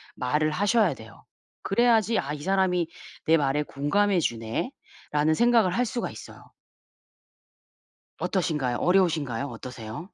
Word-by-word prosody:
말을 150 +5 0
하셔야 205 -1 +2
돼요. 110 0 -14 0.4
그래야지 225 0 +3
'아 145 +2 -3
이 145 - -7
사람이 185 -3 +1 0.4
내 165 +1 +5
말에 145 0 +1
공감해 180 +8 +1
주네.'라는 150 - -2
생각을 235 -5 +4
할 250 - +2
수가 240 +1 -3
있어요. - - -13 1.7
어떠신가요? 150 -10 -1
어려우신가요? 155 -9 +1
어떠세요? 115 +4 -8
160 Hz, 295 characters per minute, -26 LUFS, 140-200 Hz, 1.7 s, 내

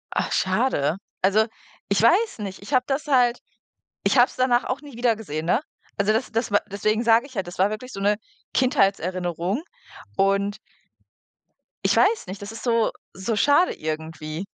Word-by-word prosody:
Ach, - - 0
schade. 185 - +1 0.2
Also, 200 +3 +4 0.4
ich 200 0 +2
weiß 370 - +3
nicht, 195 -3 -6
ich 210 +8 -8
habe 255 -1 +3
das 280 +2 -2
halt 250 -4 +3 0.7
ich - - +3
habe 245 +1 +7
es - - -15
danach 250 -1 +2
auch 260 +2 -3
nie 285 -5 -12
wiedergesehen, 220 -10 -1
ne? 195 +9 +2 0.4
Also 200 +1 +2
das 230 +3 -1
das 225 0 -1
wa 205 - +5
deswegen 215 +3 0
sage 230 +2 +4
ich 265 -2 -14
ja, 195 - -1
das 175 0 -10
war 190 +2 +4
wirklich 230 +4 -7
so - - -6
'ne 205 +1 +2 0.4
Kindheitserinnerung 195 - 0 0.5
und 200 +1 +1 1.3
ich - - +3
weiß 440 +2 +3
nicht, 190 +2 -7
das 200 +1 -7
ist 225 - -9
so 230 -2 +2 0.2
so 190 +5 -2
schade 290 - +4
irgendwie. 155 +2 -5
215 Hz, 175 wpm, -24 LUFS, 190-250 Hz, 1.3 s, habe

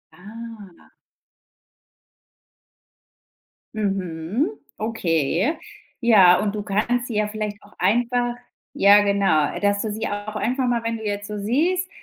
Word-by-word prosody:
Ah. 210 -1 -12 2.8
Mhm, 195 - -2 0.3
okay, 190 - 0 0.4
ja 195 -7 +6
und 210 -1 -1
du 210 - -3
kannst 225 +5 -1
sie 235 - -5
ja 210 0 +1
vielleicht 210 -1 -4
auch 205 - -19
einfach 240 +2 +1 0.4
ja 205 +1 +6
genau, 195 -7 +1
dass 205 0 +1
du 220 - -3
sie 220 +2 -3
auch 205 +1 -5
einfach 255 +3 -1
mal, 235 -1 0
wenn 230 0 -2
du 220 - -9
jetzt 205 0 -3
so 210 0 -5
siehst, 335 - 0
210 Hz, 125 wpm, -22 LUFS, 200-235 Hz, 2.8 s, ja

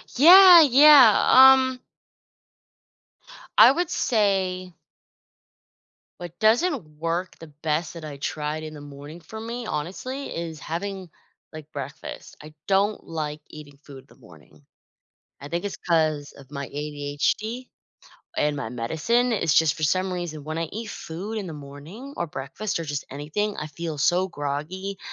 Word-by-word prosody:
Yeah, 355 +5 +9
yeah, 275 -4 +7
um 260 0 +6 1.8
I - - +9
would 350 +3 -2
say 190 -5 0 1.5
what 175 -1 -9
doesn't 220 - +1
work 170 +2 -3
the 165 -2 -12
best 155 +1 -1
that 165 - -8
I 145 -2 -8
tried 150 +2 -4
in 155 0 -8
the 145 - -10
morning 145 +3 -11
for 195 +7 -10
me, 235 +1 -6
honestly, 215 - -5
is 165 -2 -6
having, 185 +2 -6 0.4
like, 155 -1 -11
breakfast. 140 +2 -9
I 150 0 -13
don't 200 +2 +1
like 155 -2 -5
eating 145 -2 -13
food 140 -2 -13
in - - -19
the - - -28
morning. 75 -1 -19 0.8
I 140 - -9
think 170 +4 -4
it's 200 - -4
'cause 155 -4 -1
of 135 -1 -17
my 140 -1 -6
ADHD 150 - -3 0.7
and 150 0 +1
my 140 -6 -5
medicine, 160 - -1
it's 165 -9 0
just 160 -3 +4
for 155 - -11
some 185 +4 0
reason, 165 -4 -6
when 155 +2 -5
I 165 - -2
eat 220 0 -6
food 200 +7 -6
in 195 - -6
the 165 - -7
morning 150 - -11
or 170 - -3
breakfast 150 +9 -5
or - - -4
just 145 -1 -4
anything, 155 +10 -4
I 155 - -4
feel 160 +1 -6
so 180 +6 +1
groggy 175 +6 -5
165 Hz, 150 wpm, -24 LUFS, 150-210 Hz, 1.8 s, Yeah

